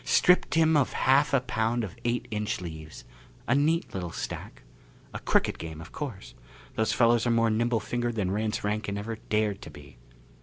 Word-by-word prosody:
Stripped 180 -2 +4
him 160 -1 +4
of 145 -4 +2
half 135 +3 +3
a 140 - +3
pound 115 -1 0
of 105 0 -6
eight 120 +1 -1
inch 105 -1 -2
leaves 80 -3 -8 0.4
a 120 - +3
neat 155 +5 +1
little 90 -2 -3
stack. - - -6 0.5
A - - -4
crooked - - +1
game, 80 -1 -7
of 85 - -10
course. 100 - -6 0.4
Those 110 - +1
fellows 120 0 +3
are - - +2
more 115 -1 +3
nimble 115 +1 +1
fingered 120 +2 -2
than 95 -4 -1
Rance 105 +1 -1
Rankin 105 -1 -2
ever 110 +2 -4
dared 105 -1 +1
to - - -9
be!" 70 -4 -14
110 Hz, 185 wpm, -28 LUFS, 100-120 Hz, 0.5 s, Stripped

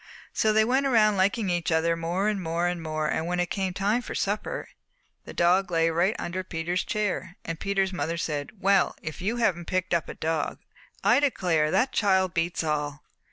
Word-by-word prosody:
"So 220 - +2
they 215 0 +4
went 265 +4 +2
around 215 -5 +4
liking 195 +1 +1
each 175 -1 -1
other 165 +1 +2
more 170 +4 -1
and 210 -2 0
more, 170 0 -1
and 160 -2 -1
when 180 0 -1
it 175 0 -1
came 190 -2 -1
time 200 +6 0
for - - -7
supper 215 - -2 0.6
the - - -8
dog 180 +2 +3
lay 165 -1 +2
right 175 +6 +2
under 180 +2 -4
Peter's 175 0 -2
chair, 190 -3 -2
and 165 -1 -4
Peter's 195 -1 0
mother 170 -2 -2
said, 150 -4 -3
'Well, 195 -1 +3
if 155 -3 -6
you 210 +6 0
haven't 185 -8 0
picked 185 0 -1
up 170 -2 0
a - - -6
dog! 160 0 -2 0.5
I - - +5
declare 175 - +1
that 255 +10 +2
child 190 -4 +2
beats 165 +1 -1
all!' 150 -1 -2
180 Hz, 190 wpm, -26 LUFS, 165-200 Hz, 0.6 s, I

